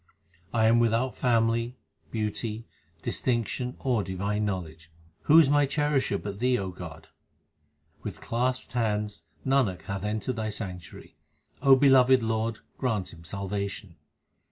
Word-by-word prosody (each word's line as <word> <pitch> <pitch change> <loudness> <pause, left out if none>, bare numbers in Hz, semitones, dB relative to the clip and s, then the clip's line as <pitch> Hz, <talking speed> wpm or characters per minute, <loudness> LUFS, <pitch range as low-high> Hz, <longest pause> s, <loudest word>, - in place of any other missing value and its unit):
I 110 -2 +2
am 115 +1 +5
without 120 +2 +2
family, 115 0 +1 0.3
beauty, 110 +1 -3 0.4
distinction, 125 +1 -1
or 120 -6 0
divine 100 +3 -2
know 100 -2 0
ledge; 80 -1 -13 0.4
who 155 - +7
is 165 -4 +8
my 145 0 +4
cherisher 145 -6 +1
but 100 -1 -6
Thee, 125 +1 +2
O 95 -3 -3
God? 85 -3 -10 0.9
With - - -6
clasped 125 +1 -2
hands 105 -5 -1 0.2
Nanak 130 -9 +2
hath 100 -1 -4
entered 110 +4 -2
Thy 110 -1 -2
sanctuary; 95 -4 -7 0.4
O 135 -1 +7
beloved 130 -2 +5
Lord, 110 0 -1 0.2
grant 105 -8 -1
him 85 0 -13
salvation. 100 +1 -4
110 Hz, 130 wpm, -28 LUFS, 100-125 Hz, 0.9 s, is